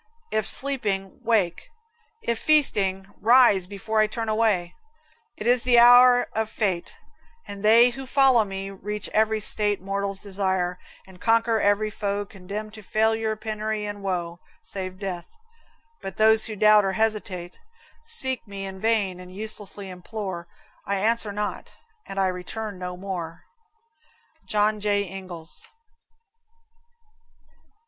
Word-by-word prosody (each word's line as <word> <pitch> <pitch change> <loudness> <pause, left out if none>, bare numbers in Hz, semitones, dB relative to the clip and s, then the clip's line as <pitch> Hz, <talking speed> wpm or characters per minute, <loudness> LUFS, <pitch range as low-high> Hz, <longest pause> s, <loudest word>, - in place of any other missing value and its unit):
If 215 -1 0
sleeping, 210 -10 0
wake 220 - 0 0.5
if 235 -1 -1
feasting, 200 -11 +2 0.2
rise 225 -5 +5
before 205 +3 -2
I 215 - +4
turn 225 +1 -4
away. 215 -6 +1 0.6
It 210 - -7
is 245 0 +4
the 245 -1 +3
hour 245 +1 +7
of 220 0 -1
fate, 195 -6 -2 0.5
And 200 -1 -8
they 230 +3 +6
who 265 +2 -8
follow 265 -4 +4
me 195 -1 -6
reach 205 +2 -5
every 220 0 +1
state 205 -1 +1
Mortals 195 +1 -2
desire, 190 -3 -2 0.3
and 190 -1 -17
conquer 230 0 +2
every 205 +1 +2
foe 205 -1 -3
Condemned 200 +2 -8
to 220 - -10
failure, 220 +1 0
penury, 215 -1 -3
and 205 -1 -6
woe. 175 -3 -3 0.2
Save 185 -1 -4
death; 185 - -6 0.7
but 195 -2 -7
those 220 0 +4
who 220 - -6
doubt 210 0 +5
or 195 -1 0
hesitate, 200 -5 -2 0.4
Seek 265 - +4
me 195 -1 -6
in 190 0 -7
vain 205 -4 0
and 180 0 -11
uselessly 205 0 -6
implore: 180 -1 -6 0.4
I 200 - -2
answer 220 +2 0
not, 210 +1 -5 0.3
and 195 - -5
I 195 - +3
return 190 +2 -5
no 180 0 -5
more. 175 -3 -6 1.0
John 210 0 +1
J. 205 -1 +1
Ingalls. 180 -3 -10
205 Hz, 135 wpm, -24 LUFS, 190-220 Hz, 1.0 s, hour